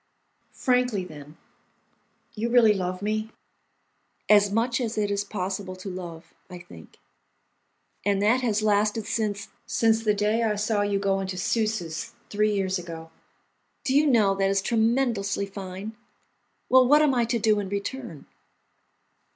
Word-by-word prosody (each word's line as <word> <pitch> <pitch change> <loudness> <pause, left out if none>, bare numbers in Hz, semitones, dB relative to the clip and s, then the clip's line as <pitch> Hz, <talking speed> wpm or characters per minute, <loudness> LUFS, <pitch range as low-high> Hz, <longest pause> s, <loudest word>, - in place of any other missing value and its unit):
"Frankly, 250 -6 +1
then, 150 -2 -12 1.0
you 225 +2 -2
really 235 -3 +5
love 185 -1 -3
me?" 215 +1 -1 1.0
"As 205 -1 +5
much 240 +4 0
as 230 -2 -3
it 205 -1 0
is 200 0 0
possible 190 -1 -4
to 185 +1 -7
love, 170 -3 -9 0.2
I 180 - -8
think." 175 - -14 1.1
"And 200 0 +1
that 225 +6 +3
has 215 -3 0
lasted 210 +1 +1
since—?" 210 -2 -2 0.2
"Since 225 -1 +2
the 210 -2 +2
day 210 +3 +1
I 220 -2 +1
saw 210 0 0
you 205 -1 0
go 195 -1 0
into 190 -1 -4
Susse's, 205 -5 -2 0.2
three 210 +1 +2
years 190 -2 0
ago." 165 -2 -9 0.7
"Do 270 -3 0
you 300 +1 +5
know, 220 -7 +4
that 195 0 +2
is 195 0 +1
tremendously 225 -4 +1
fine? 195 +2 -7 0.7
Well, 255 -1 +6
what 295 +3 +6
am 290 -3 +3
I 240 -2 +2
to 235 +1 0
do 215 -1 +2
in 200 -2 -4
return?" 200 - -5
210 Hz, 150 wpm, -25 LUFS, 195-225 Hz, 1.1 s, Well